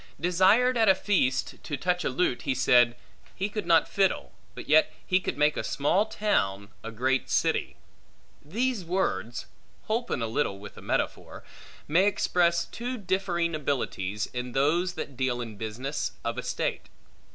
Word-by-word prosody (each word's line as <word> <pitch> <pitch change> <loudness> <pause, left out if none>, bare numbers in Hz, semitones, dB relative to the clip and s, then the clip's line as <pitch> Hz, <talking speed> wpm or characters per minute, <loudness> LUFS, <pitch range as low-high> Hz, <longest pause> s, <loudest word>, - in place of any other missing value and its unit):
Desired 195 +8 +4
at 220 -2 +5
a 190 - +7
feast 180 -10 0
to 145 - -4
touch 180 -1 0
a - - 0
lute, 130 -1 0
he 135 -2 -1
said, 120 -1 +4 0.4
He 195 +2 -2
could 210 -4 -4
not 165 -1 +5
fiddle, 195 -2 0 0.2
but - - -8
yet 155 +1 +5
he 185 - +3
could 185 - -4
make 150 0 +3
a - - -2
small 185 +9 +1
town, 100 - 0
a 115 - -5
great 130 +4 0
city. - - +1 0.7
These 225 - -1
words 120 - -2 0.4
(holpen 220 - -1
a - - +1
little 110 -3 -1
with 100 0 -11
a - - -11
metaphor) - - -3 0.4
may 180 +6 +4
express 175 -4 +2
two 245 +2 -5
differing 180 -4 -1
abilities, 105 -9 -2
in 125 0 -4
those 170 +7 +2
that 140 - -6
deal 125 -1 -1
in 115 -3 -6
business 115 +7 -4
of - - -2
estate. - - -3
155 Hz, 160 wpm, -27 LUFS, 125-190 Hz, 0.7 s, a